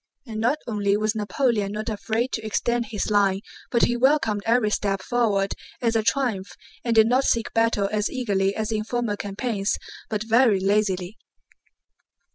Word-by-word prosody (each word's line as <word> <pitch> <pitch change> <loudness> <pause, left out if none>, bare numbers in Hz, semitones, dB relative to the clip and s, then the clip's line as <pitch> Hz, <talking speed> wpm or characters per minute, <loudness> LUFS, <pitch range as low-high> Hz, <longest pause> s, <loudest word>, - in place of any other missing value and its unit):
And 220 -3 -6
not 245 +6 +2
only 205 -3 +1
was 215 0 0
Napoleon 215 -1 0
not 215 +1 -4
afraid 225 +3 -1
to 220 - -3
extend 235 +2 -1
his 210 0 -3
line, 200 -2 +3 0.3
but 235 - +2
he 240 - +3
welcomed 240 -5 +2
every 230 -2 +3
step 195 -2 0
forward 210 -5 +1 0.3
as 230 -2 0
a 225 - +3
triumph 215 -5 -1 0.3
and 235 -1 0
did 220 -1 +7
not 250 +4 +3
seek 230 -4 0
battle 225 -3 +2
as 210 0 0
eagerly 200 -6 0
as 220 0 -2
in 215 -1 -1
former 235 -1 -2
campaigns, 205 0 -2 0.3
but 215 -1 -2
very 225 -2 +4
lazily. 195 -1 0
215 Hz, 165 wpm, -24 LUFS, 205-235 Hz, 0.3 s, did